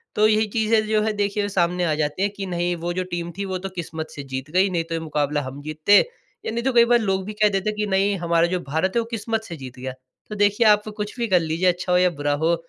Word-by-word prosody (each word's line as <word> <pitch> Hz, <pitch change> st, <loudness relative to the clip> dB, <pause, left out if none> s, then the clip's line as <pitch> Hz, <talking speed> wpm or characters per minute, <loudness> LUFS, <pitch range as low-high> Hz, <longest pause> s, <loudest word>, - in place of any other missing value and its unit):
तो 215 Hz, +1 st, +5 dB
यही 215 Hz, 0 st, +2 dB
चीज़ें 220 Hz, -1 st, +2 dB
जो 215 Hz, -1 st, +2 dB
है 220 Hz, 0 st, 0 dB
देखिए 205 Hz, 0 st, -1 dB
सामने 180 Hz, -1 st, +1 dB
आ 155 Hz, -, +1 dB
जाती 150 Hz, +5 st, -1 dB
है 205 Hz, -, +2 dB
कि 200 Hz, -1 st, -6 dB
नहीं 175 Hz, -1 st, -1 dB
वो 170 Hz, +1 st, -3 dB
जो 185 Hz, +1 st, -1 dB
टीम 175 Hz, 0 st, -3 dB
थी, 200 Hz, -, -2 dB
वो 190 Hz, -1 st, -3 dB
तो 195 Hz, +1 st, -6 dB
किस्मत 160 Hz, -2 st, -5 dB
से 140 Hz, -, -6 dB
जीत 130 Hz, +1 st, -6 dB
गई 190 Hz, +3 st, +3 dB
नहीं 170 Hz, -2 st, -1 dB
तो 165 Hz, -, -7 dB
ये -, -, -1 dB
मुकाबला 150 Hz, -2 st, -1 dB
हम 135 Hz, +1 st, -7 dB
जीतते। 155 Hz, +7 st, +4 dB, 0.5 s
या -, -, -2 dB
नहीं 235 Hz, +1 st, -2 dB
तो 265 Hz, 0 st, +1 dB
कई 235 Hz, -1 st, +6 dB
बार 240 Hz, 0 st, +4 dB
लोग 190 Hz, -3 st, -1 dB
भी 215 Hz, -, -5 dB
कह 210 Hz, -, +6 dB
देते 210 Hz, +2 st, -1 dB
कि 210 Hz, -, 0 dB
नहीं 200 Hz, +1 st, +2 dB
हमारा 170 Hz, 0 st, +3 dB
जो 180 Hz, 0 st, -1 dB
भारत 160 Hz, +5 st, 0 dB
है -, -, +4 dB
वो -, -, -5 dB
किस्मत 225 Hz, 0 st, -2 dB
से 175 Hz, -6 st, -7 dB
जीत 130 Hz, -2 st, -10 dB
गया। 130 Hz, 0 st, -5 dB, 0.4 s
तो 210 Hz, -, -5 dB
देखिए 205 Hz, +2 st, +3 dB
आप 210 Hz, 0 st, +4 dB
कुछ 210 Hz, +3 st, -5 dB
भी 235 Hz, -, 0 dB
कर 185 Hz, -4 st, +4 dB
लीजिए 165 Hz, +2 st, 0 dB
अच्छा 180 Hz, +1 st, -4 dB
हो 180 Hz, -, +5 dB
या 180 Hz, 0 st, +4 dB
बुरा 145 Hz, 0 st, +1 dB
हो। 170 Hz, -, +3 dB
185 Hz, 285 wpm, -23 LUFS, 165-210 Hz, 0.5 s, कई